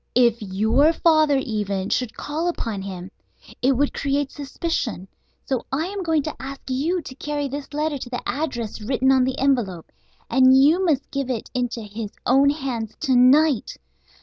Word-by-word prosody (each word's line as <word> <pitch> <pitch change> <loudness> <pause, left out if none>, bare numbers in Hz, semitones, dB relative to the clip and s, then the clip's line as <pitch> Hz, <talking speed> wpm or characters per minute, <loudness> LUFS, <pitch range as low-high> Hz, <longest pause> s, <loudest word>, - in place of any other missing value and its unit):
If 235 -2 +4
your 220 - +2
father, 310 -4 +3
even, 205 -6 -2
should 250 -3 -1
call 310 +4 -3
upon 225 - -3
him 190 -1 -7 0.5
it 265 +2 +3
would 280 +3 0
create 280 0 -1
suspicion. 280 - -3 0.4
So 260 -3 -1
I 290 +5 0
am 395 +2 -4
going 320 -4 +1
to 310 - -4
ask 275 +1 -6
you 320 +7 0
to 260 - -9
carry 290 +1 -3
this 280 +1 -6
letter 300 -1 -1
to 245 - -7
the 245 - -5
address 245 -7 -3
written 260 +4 +1
on 260 -1 +4
the 260 0 -2
envelope, 240 -11 0 0.4
and 260 +1 +5
you 310 +7 +5
must 300 -7 0
give 275 -3 -2
it 245 -4 -4
into 245 -2 -2
his 210 +1 -6 0.2
own 270 +3 +5
hands 260 -7 -3
to 260 - +2
night. 265 +1 +4
265 Hz, 175 wpm, -23 LUFS, 235-290 Hz, 0.5 s, and